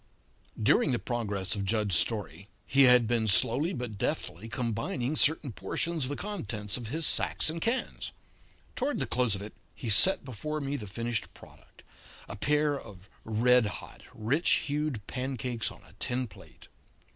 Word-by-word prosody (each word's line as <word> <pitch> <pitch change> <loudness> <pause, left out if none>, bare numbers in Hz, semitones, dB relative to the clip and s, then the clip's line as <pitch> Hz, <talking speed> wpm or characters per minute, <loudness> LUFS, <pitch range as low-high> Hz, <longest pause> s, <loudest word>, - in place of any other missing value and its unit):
'" - - -12
During 140 - +3
the - - +1
progress 105 -6 -1
of 100 - -3
Jud's 105 -2 0
story 100 0 -1 0.2
he 140 0 +5
had 125 -1 +6
been 115 -1 0
slowly 125 - +4
but 120 - -5
deftly 100 +5 -3
combining 120 +2 -2
certain 155 -3 +2
portions 130 - -2
of - - -5
the 145 - -3
contents 105 - -3
of 120 -3 -4
his 155 +7 -1
sacks - - +1
and 165 +1 -6
cans. 235 +7 -2 0.6
Toward 280 +3 -1
the - - -1
close 125 -4 +1
of 100 - -7
it 105 - -9 0.2
he 115 - -2
set 185 - +9
before 140 +5 -5
me 140 0 -3
the 105 -7 -6
finished 115 +1 -4
product - - -18 0.4
a - - -7
pair 150 +5 +1
of 100 -3 -14
red 120 +1 +3
hot, 100 - -9
rich 125 +12 +1
hued 145 -7 -3
pancakes 125 -3 -3
on - - -15
a - - -19
tin 125 +1 -1
plate. 105 - -16
120 Hz, 170 wpm, -29 LUFS, 105-145 Hz, 0.6 s, set